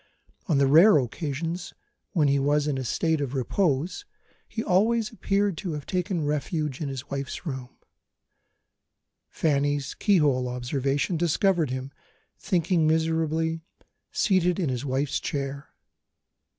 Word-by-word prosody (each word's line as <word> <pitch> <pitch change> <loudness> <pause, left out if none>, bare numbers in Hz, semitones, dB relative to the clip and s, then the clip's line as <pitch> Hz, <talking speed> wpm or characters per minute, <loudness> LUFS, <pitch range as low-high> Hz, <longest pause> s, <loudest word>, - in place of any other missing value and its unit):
On 155 - +2
the 140 - +4
rare 165 +8 +7
occasions 155 +6 -3 0.4
when 155 -6 +3
he 140 0 +3
was 145 +1 +2
in 145 -3 -1
a - - -3
state 160 +5 0
of 140 -1 -3
repose, 155 - 0 0.4
he 225 - -4
always 215 +4 +2
appeared 200 -4 0
to 180 -6 -4
have 150 -2 -5
taken 180 -3 -1
refuge 150 -1 -2
in 145 - -2
his 135 +1 -7
wife's 140 +5 -4
room; 130 -5 -6 1.5
Fanny's 145 -2 0
keyhole 145 - +2
observation 135 +6 -1
discovered 175 -1 +2
him, 130 +1 -4 0.5
thinking 170 -3 +1
miserably, 160 0 0 0.5
seated 180 -3 +2
in 165 -7 0
his 125 0 -2
wife's 135 +1 -1
chair. 140 0 -4
150 Hz, 125 wpm, -26 LUFS, 140-175 Hz, 1.5 s, rare